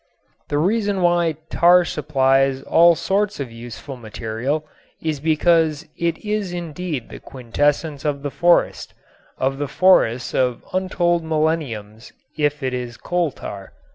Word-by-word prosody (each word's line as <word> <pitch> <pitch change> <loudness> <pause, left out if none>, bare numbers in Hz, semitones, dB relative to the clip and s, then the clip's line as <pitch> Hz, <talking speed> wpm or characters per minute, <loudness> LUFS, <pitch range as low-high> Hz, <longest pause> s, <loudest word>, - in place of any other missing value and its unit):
The 145 - 0
reason 200 +3 +1
why 175 -2 +3 0.2
tar 175 +1 +5
supplies 135 -3 +1
all 170 +1 +5
sorts 205 +3 -1
of 135 -4 -4
useful 120 +3 -9
material 120 +6 -3 0.3
is 155 -3 -2
because 160 0 +2
it 170 -1 -1
is 210 -3 -2
indeed 170 -5 -5
the - - -9
quintessence 145 +4 -1
of 145 -2 -2
the 145 - -3
forest, 175 +3 +2 0.4
of 135 +1 -1
the 145 - -1
forests 130 -8 +3
of 125 -2 0
untold 175 -2 +1
millenniums 150 -9 -2 0.2
if 145 -1 0
it 130 -1 -1
is 125 -2 -5
coal 175 -2 0
tar. 100 -5 -9
150 Hz, 135 wpm, -21 LUFS, 130-175 Hz, 0.4 s, tar